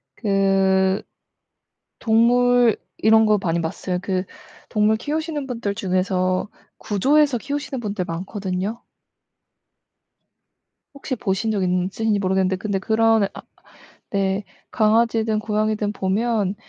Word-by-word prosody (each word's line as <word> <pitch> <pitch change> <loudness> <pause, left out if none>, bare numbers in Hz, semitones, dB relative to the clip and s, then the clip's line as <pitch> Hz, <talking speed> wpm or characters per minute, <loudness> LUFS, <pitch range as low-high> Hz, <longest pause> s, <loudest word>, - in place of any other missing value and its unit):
그 195 -1 +2 1.0
동물 240 0 +4 0.2
이런 220 +1 +5
거 215 -1 +4
많이 170 -1 0
봤어요. 180 +2 -3
그 185 -1 -1 0.5
동물 215 0 +2
키우시는 300 +1 -3
분들 230 -5 -3
중에서 185 0 0 0.3
구조해서 275 +6 +2
키우시는 280 +1 -4
분들 205 -5 -3
많거든요. 190 +4 -4 2.1
혹시 270 -2 -4
보신 210 +1 -1
적 205 -3 0
있으신지 190 +4 0
모르겠는데 190 0 +1
근데 200 +1 -2
그런 220 +1 +2
아 - - -9 0.7
네 195 0 0 0.3
강아지든 220 0 +2
고양이든 215 -1 -1
보면 205 0 0
210 Hz, 240 characters per minute, -22 LUFS, 190-225 Hz, 2.1 s, 이런